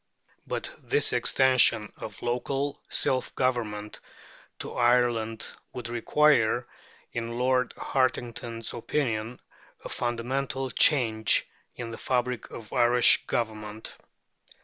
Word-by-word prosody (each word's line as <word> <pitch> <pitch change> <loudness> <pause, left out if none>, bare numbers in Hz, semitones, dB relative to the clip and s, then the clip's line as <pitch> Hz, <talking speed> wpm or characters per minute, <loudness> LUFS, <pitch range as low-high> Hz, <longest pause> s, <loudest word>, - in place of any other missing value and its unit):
But - - -3
this - - 0
extension 130 -5 +3
of 105 -3 -9
local 135 +4 -2
self 130 -1 -1
government 110 -5 -1 0.6
to - - -7
Ireland 120 -2 +2 0.3
would 120 -2 -6
require, 120 -1 +3 0.5
in 115 0 -4
Lord 125 0 +2
Hartington's 120 -3 -2
opinion, 120 -2 -2 0.5
a - - -5
fundamental 130 +2 -2
change 110 - +4 0.3
in 120 -2 -6
the 115 - -8
fabric 125 -1 -1
of 110 -3 -10
Irish 120 -1 +5
Government. 110 -2 -4
120 Hz, 100 wpm, -27 LUFS, 115-130 Hz, 0.6 s, Irish